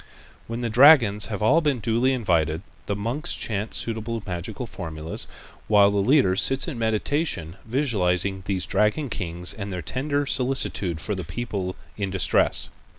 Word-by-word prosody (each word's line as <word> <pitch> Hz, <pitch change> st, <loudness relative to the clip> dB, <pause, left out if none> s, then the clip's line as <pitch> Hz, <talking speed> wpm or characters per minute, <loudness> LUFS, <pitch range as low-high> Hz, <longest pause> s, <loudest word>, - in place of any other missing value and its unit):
When 115 Hz, +1 st, -4 dB
the 120 Hz, -, -1 dB
dragons 115 Hz, -6 st, +6 dB
have 105 Hz, -1 st, -4 dB
all 150 Hz, +10 st, +4 dB
been 145 Hz, -5 st, 0 dB
duly 115 Hz, +4 st, +1 dB
invited, 85 Hz, -, 0 dB, 0.2 s
the 100 Hz, -, -1 dB
monks 115 Hz, +9 st, -2 dB
chant 105 Hz, 0 st, -3 dB
suitable 115 Hz, -1 st, -2 dB
magical 90 Hz, +7 st, -5 dB
formulas, 80 Hz, -6 st, -4 dB, 0.4 s
while 100 Hz, -1 st, +5 dB
the 100 Hz, -, -1 dB
leader 100 Hz, -2 st, +3 dB
sits 135 Hz, -, +2 dB
in 140 Hz, -8 st, -5 dB
meditation 110 Hz, -, -1 dB
visualizing 100 Hz, -7 st, 0 dB
these 95 Hz, -2 st, -1 dB
dragon 105 Hz, +7 st, 0 dB
kings 90 Hz, -2 st, -2 dB
and 100 Hz, -1 st, -6 dB
their 90 Hz, -2 st, -4 dB
tender 145 Hz, -, -1 dB
solicitude 125 Hz, -, 0 dB
for 105 Hz, -, -3 dB
the 95 Hz, -2 st, -4 dB
people 95 Hz, 0 st, -4 dB, 0.2 s
in 100 Hz, -2 st, -2 dB
distress. 95 Hz, -1 st, +1 dB
105 Hz, 150 wpm, -24 LUFS, 95-125 Hz, 0.4 s, dragons